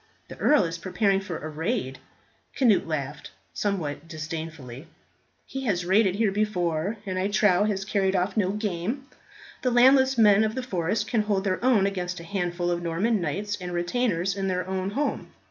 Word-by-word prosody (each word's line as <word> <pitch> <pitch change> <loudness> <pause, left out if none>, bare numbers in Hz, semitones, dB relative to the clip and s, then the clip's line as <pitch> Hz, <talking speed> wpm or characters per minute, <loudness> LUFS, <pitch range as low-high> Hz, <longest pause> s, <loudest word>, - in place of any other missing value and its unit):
The - - -9
earl 300 - +4
is 165 -1 -3
preparing 195 +2 +1
for 185 -4 -5
a 155 - -6
raid." 155 - -3 0.6
Cnut 225 -10 +3
laughed 150 -2 -4 0.2
somewhat 165 -7 -2
disdainfully. 155 -4 -7 0.6
"He 270 0 -6
has 180 -6 0
raided 190 +1 +3
here 215 -1 +2
before, 190 -2 -1
and 185 -1 -2
I 190 - +1
trow 205 -2 +3
has 195 -2 -1
carried 195 -2 +1
off 185 +2 0
no 200 -4 +2
game. 210 +5 -3 0.6
The 255 - +1
landless 260 +2 +5
men 210 -2 +6
of 220 0 -1
the 260 - -3
forest 185 -3 -1
can 230 -3 +1
hold 205 -2 0
their 190 +2 -1
own 240 -6 +4
against 180 -3 -3
a - - -9
handful 175 -1 -2
of 175 0 -1
Norman 185 +6 0
knights 200 +6 -2
and 180 0 -5
retainers 180 0 0
in 195 -1 -2
their 180 -1 -1
own 190 0 -2
home." 280 +8 -2
190 Hz, 180 wpm, -26 LUFS, 175-215 Hz, 0.6 s, men